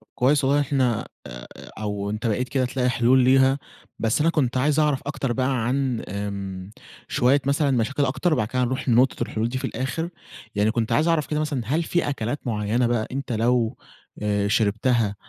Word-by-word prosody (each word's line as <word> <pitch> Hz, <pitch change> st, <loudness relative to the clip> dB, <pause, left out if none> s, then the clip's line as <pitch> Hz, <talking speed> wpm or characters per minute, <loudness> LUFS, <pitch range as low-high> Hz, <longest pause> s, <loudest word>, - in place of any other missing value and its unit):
كويس 135 Hz, +3 st, +3 dB
والله 140 Hz, +2 st, +3 dB
إن -, -, +2 dB
إحنا 130 Hz, -5 st, 0 dB, 0.2 s
آآ، -, -, -9 dB, 0.3 s
أو 105 Hz, -1 st, -3 dB
أنت 110 Hz, +3 st, -3 dB
بقيت 125 Hz, +4 st, -1 dB
كده 130 Hz, -2 st, +1 dB
تلاقي 125 Hz, 0 st, 0 dB
حلول 125 Hz, +1 st, +3 dB
ليها. 130 Hz, +2 st, +4 dB, 0.4 s
بس 115 Hz, +6 st, +1 dB
أنا 165 Hz, -, +3 dB
كنت 130 Hz, -6 st, 0 dB
عايز 145 Hz, +3 st, +2 dB
أعرف 150 Hz, -3 st, +2 dB
أكتر 135 Hz, -3 st, -2 dB
بقى 130 Hz, -1 st, 0 dB
عن 130 Hz, -2 st, 0 dB
امم، 100 Hz, -1 st, -5 dB, 0.4 s
شوية 135 Hz, +3 st, +2 dB
مثلًا 140 Hz, +1 st, +2 dB
مشاكل 135 Hz, +3 st, +1 dB
أكتر 160 Hz, +6 st, 0 dB
وبعد 110 Hz, -8 st, 0 dB
كده 125 Hz, +2 st, 0 dB
هنروح 130 Hz, +2 st, -2 dB
لنقطة 125 Hz, +2 st, +3 dB
الحلول 115 Hz, +2 st, -2 dB
دي 130 Hz, -, -3 dB
في 130 Hz, -, -3 dB
الآخر. 130 Hz, +7 st, -3 dB, 0.5 s
يعني 105 Hz, +1 st, +2 dB
كنت 115 Hz, -1 st, -1 dB
عايز 155 Hz, -, +3 dB
أعرف 165 Hz, -3 st, +1 dB
كده 150 Hz, -, -1 dB
مثلًا 150 Hz, -5 st, -1 dB
هل 155 Hz, +9 st, 0 dB
في 175 Hz, -1 st, 0 dB
أكلات 130 Hz, 0 st, -3 dB
معينة 110 Hz, +2 st, 0 dB
بقى 120 Hz, -2 st, 0 dB
أنت 135 Hz, -1 st, -4 dB
لو 115 Hz, 0 st, +1 dB, 0.7 s
شربتها 110 Hz, +1 st, +1 dB
125 Hz, 185 wpm, -24 LUFS, 110-140 Hz, 0.7 s, ليها